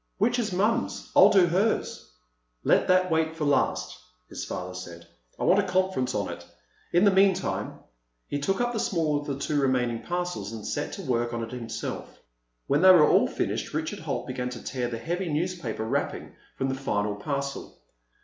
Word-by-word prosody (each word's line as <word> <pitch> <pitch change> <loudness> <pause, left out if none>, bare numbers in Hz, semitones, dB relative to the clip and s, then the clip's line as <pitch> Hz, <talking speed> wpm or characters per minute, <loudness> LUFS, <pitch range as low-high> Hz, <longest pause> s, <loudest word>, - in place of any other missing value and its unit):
"Which 240 +5 +2
is 220 -4 -1
Mom's? 215 +6 0
I'll - - +8
do 190 -3 +5
hers." 190 +6 -1 0.5
"Let - - +3
that 185 -1 +3
wait 160 0 +1
for 160 -2 -2
last," 145 - 0 0.3
his - - -6
father 90 0 -5
said. 85 -2 -9 0.3
"I - - -4
want 190 - +5
a 200 - 0
conference 185 -9 0
on - - -1
it. - - -7 0.5
In 175 +2 +4
the 200 - +6
meantime—" 190 -1 +1 0.5
He 145 - -2
took 190 +7 0
up 240 0 0
the 225 - -1
smaller 155 -7 0
of 145 - -10
the 140 -2 -2
two 145 +1 0
remaining 125 -3 +1
parcels 175 - -3
and 110 -2 -7
set 145 - -3
to 195 - -6
work 120 -4 -1
on 115 - -3
it 115 - -7
himself. 115 -3 -6 0.5
When 140 +2 +2
they 190 - +8
were 175 -5 +8
all - - +4
finished, - - -3
Richard - - -3
Holt - - -3
began 125 0 -3
to 125 -2 -8
tear 125 -2 -2
the 120 -1 -4
heavy 175 +9 -3
newspaper 150 -9 -2
wrapping 110 - -2 0.2
from 135 - -1
the - - 0
final 105 -6 -1
parcel. 140 +5 -4
150 Hz, 190 wpm, -27 LUFS, 120-185 Hz, 0.5 s, I'll